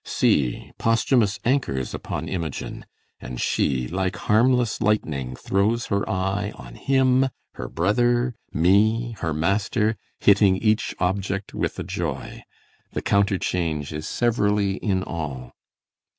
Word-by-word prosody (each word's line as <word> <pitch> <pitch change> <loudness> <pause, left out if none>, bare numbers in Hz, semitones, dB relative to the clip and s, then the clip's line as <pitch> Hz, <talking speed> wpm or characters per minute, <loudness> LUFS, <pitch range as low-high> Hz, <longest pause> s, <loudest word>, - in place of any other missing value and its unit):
See, 65 -4 +1
Posthumus 115 -2 +2
anchors 115 - 0
upon - - -4
Imogen; 85 -7 -5 0.3
And 60 - -7
she, 65 -3 0
like 95 +2 -1
harmless 120 +4 +2
lightning, 70 -12 0
throws 105 - 0
her 100 - 0
eye 95 +2 -1
On - - -11
him, 130 - +3 0.3
her - - -6
brothers, 120 +7 +1 0.2
me, 110 +8 +3
her 80 - -1
master, 100 +7 +1 0.2
hitting 100 -2 +5
Each 110 +1 +1
object 95 +1 -2
with - - -2
a - - -3
joy; - - -4 0.5
the - - -3
counterchange 90 -7 0
Is 75 +1 -5
severally 105 -4 +1
in 95 -4 0
all. 70 -9 -5
100 Hz, 120 wpm, -24 LUFS, 85-110 Hz, 0.5 s, hitting